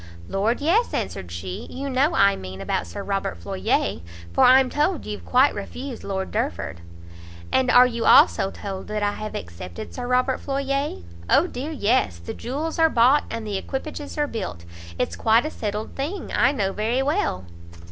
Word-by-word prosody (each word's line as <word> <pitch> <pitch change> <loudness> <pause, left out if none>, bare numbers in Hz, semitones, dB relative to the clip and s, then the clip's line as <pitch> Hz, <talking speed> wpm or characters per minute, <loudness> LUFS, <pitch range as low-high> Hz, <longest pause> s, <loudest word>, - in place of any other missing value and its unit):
"Lord 220 +7 0
yes," 375 +11 +2
answered 90 - -3
she, 90 +2 -6
"you 275 +2 -5
know 275 +5 +2
I 200 0 +5
mean 95 0 -8
about 95 -3 -2
Sir 85 - -6
Robert 195 - -2
Floyer; 85 -1 -1 0.3
for - - +4
I'm 260 +1 +7
told 300 +5 0
you've 210 -1 -6
quite 260 +3 +4
refused 245 +5 -6
Lord 190 -1 -3
Derford." 215 - -3 0.7
"And 260 -1 +2
are 250 0 +8
you 235 -2 -2
also 195 - +6
told 195 -1 -7
that 210 0 -2
I 205 - +2
have 215 +1 -6
accepted 85 0 -7
Sir 245 -1 -5
Robert 255 +1 +2
Floyer?" 275 - -2 0.3
"O 320 - +5
dear 285 -4 -5
yes! 220 - +1
the 85 - -7
jewels 300 +7 -4
are 325 0 +6
bought, 260 +3 +4
and 230 -1 -5
the 205 -2 -2
equipages 290 +6 -6
are 295 - +2
built; 185 - -5 0.3
it's 85 - -1
quite 225 - +3
a 310 - -3
settled 210 0 -4
thing, 320 +8 -4
I 255 - +4
know 195 -8 -1
very 235 +5 0
well." 280 - 0
235 Hz, 180 wpm, -24 LUFS, 195-275 Hz, 0.7 s, are